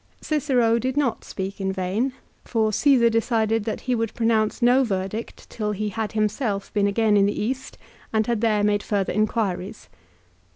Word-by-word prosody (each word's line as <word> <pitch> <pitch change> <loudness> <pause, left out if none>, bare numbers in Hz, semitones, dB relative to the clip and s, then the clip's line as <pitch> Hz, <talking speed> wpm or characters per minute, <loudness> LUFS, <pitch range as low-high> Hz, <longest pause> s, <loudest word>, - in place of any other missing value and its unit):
Cicero 255 -7 +1
did 260 +3 -2
not 270 -6 0
speak 195 +1 -5
in 190 0 0
vain, 195 +8 -1 0.3
for 220 -2 0
Caesar 260 -1 +4
de 230 0 +2
cided 225 -2 0
that 220 - -3
he 255 - -1
would 225 -2 -2
pronounce 225 -2 +1
no 250 +2 +4
verdict 200 0 -4
till 210 -2 -3
he 210 +1 -2
had 215 0 -4
himself 215 -1 -1
been 205 -1 +2
again 215 +1 +2
in 200 -1 +4
the 205 - -2
East 260 +5 -3 0.3
and 220 -1 +1
had 235 -2 -1
there 215 -3 +2
made 205 0 +2
further 200 -3 -1
inquiries. 210 -1 -2
220 Hz, 175 wpm, -23 LUFS, 205-235 Hz, 0.3 s, Caesar